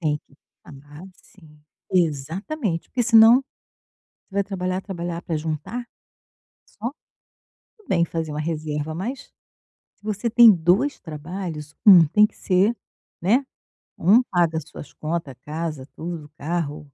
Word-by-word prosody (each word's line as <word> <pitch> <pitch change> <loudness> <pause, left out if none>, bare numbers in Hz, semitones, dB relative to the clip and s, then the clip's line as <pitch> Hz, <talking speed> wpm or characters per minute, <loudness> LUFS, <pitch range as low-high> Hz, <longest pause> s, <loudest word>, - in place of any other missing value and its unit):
Tem 150 -3 0
que 140 - -27 0.3
ah, 145 +3 -13
sim. 155 -5 -21 0.3
Exatamente. 170 - -1
Porque 250 - -1
senão 225 0 +7 0.9
você 195 - -16
vai 200 - +2
trabalhar, 185 -1 -3
trabalhar, 175 -3 -5
pra 165 - -3
juntar 160 +10 -4 0.8
só? 230 +4 -6 0.9
Tudo 430 -4 -25
bem 170 -2 +3
fazer 160 -2 -4
uma 150 - -3
reserva, 155 -1 -3
mas 235 - -5 0.7
se - - -42
você 215 +2 -2
tem 235 0 +8
2 190 - +2
trabalhos, 155 -1 -7
um 185 -6 +9
tem 210 +8 +4
que - - -27
ser 195 +5 +2 0.5
né, 235 +10 +2 0.5
um 215 +9 +5
paga 170 -6 +1
as 160 - -4
suas 145 - -11
conta, 160 -2 -4
a - - -14
casa, 150 +1 -5
tudo, 165 -2 -6
o - - -16
carro 155 -1 -3
170 Hz, 140 wpm, -23 LUFS, 155-205 Hz, 0.9 s, um